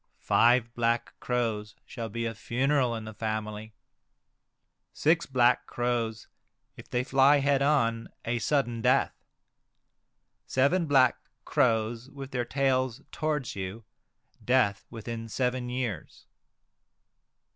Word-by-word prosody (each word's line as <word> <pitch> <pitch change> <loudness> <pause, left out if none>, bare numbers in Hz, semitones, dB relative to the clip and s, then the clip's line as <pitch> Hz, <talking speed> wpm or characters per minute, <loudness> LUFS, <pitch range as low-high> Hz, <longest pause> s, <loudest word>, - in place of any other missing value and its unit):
Five 120 0 +3
black 115 0 0
crows 110 -4 -2
shall 115 -3 -6
be 115 +2 -3
a 115 - -2
funeral 125 +2 0
in 110 -1 -6
the 110 - -8
family. 110 0 -4 1.2
Six 165 +3 +2
black 125 -2 +3
crows, 120 -2 -2 0.5
if - - -13
they 125 0 0
fly 135 +2 +5
head 140 0 +2
on, 115 -6 +1 0.2
a 120 +1 -1
sudden 120 -4 0
death. - - +3 1.3
Seven 150 +7 +2
black 130 -4 +4 0.3
crows 115 +1 +1
with 140 -1 -9
their 125 -1 -1
tails 130 -1 0
towards 150 -6 -2
you, 95 +3 -6 0.6
death 120 -6 +2
within 115 0 -6
seven 125 +1 -1
years. 125 - -4
120 Hz, 115 wpm, -28 LUFS, 115-135 Hz, 1.3 s, fly